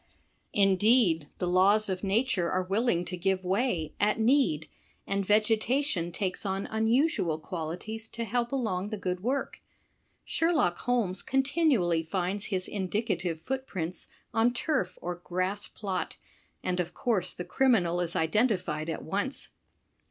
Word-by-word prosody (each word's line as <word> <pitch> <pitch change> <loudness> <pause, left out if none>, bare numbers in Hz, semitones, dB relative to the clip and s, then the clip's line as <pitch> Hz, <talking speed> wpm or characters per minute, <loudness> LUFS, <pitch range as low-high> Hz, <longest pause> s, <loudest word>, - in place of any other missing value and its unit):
Indeed 195 - +4
the 180 - -2
laws 195 +4 +4
of 185 -1 -3
nature 200 -3 +1
are 185 0 +1
willing 195 -1 +1
to 180 - -4
give 190 +1 0
way, 190 - 0
at 210 +3 +2
need, 225 - +3 0.4
and 200 0 0
vegeta 220 +6 +2
tion 175 -11 0
takes 185 0 -2
on 195 -1 -2
unusual 220 - +1
qualities 180 +7 -5
to 235 - -4
help 235 +2 -1
along 210 -8 -1
the 215 - -3
good 180 -2 -2
work. 260 +6 -2 0.6
Sherlock 320 - +1
Holmes 230 -7 0
continually 265 - +2
finds 185 +4 -2
his 185 -2 -2
indicative 190 -4 -2
footprints 185 -9 -3 0.3
on 230 +2 +3
turf 300 +2 -1
or 175 +1 -3
grass 185 +3 -1
plot, 195 -4 -4 0.5
and 180 0 -1
of 175 -1 -2
course 210 -8 0
the 180 - -5
criminal 185 -10 +2
is 170 -1 -2
identified 170 -4 +1
at 160 - -4
once. 205 - -3
195 Hz, 135 wpm, -29 LUFS, 180-230 Hz, 0.6 s, Indeed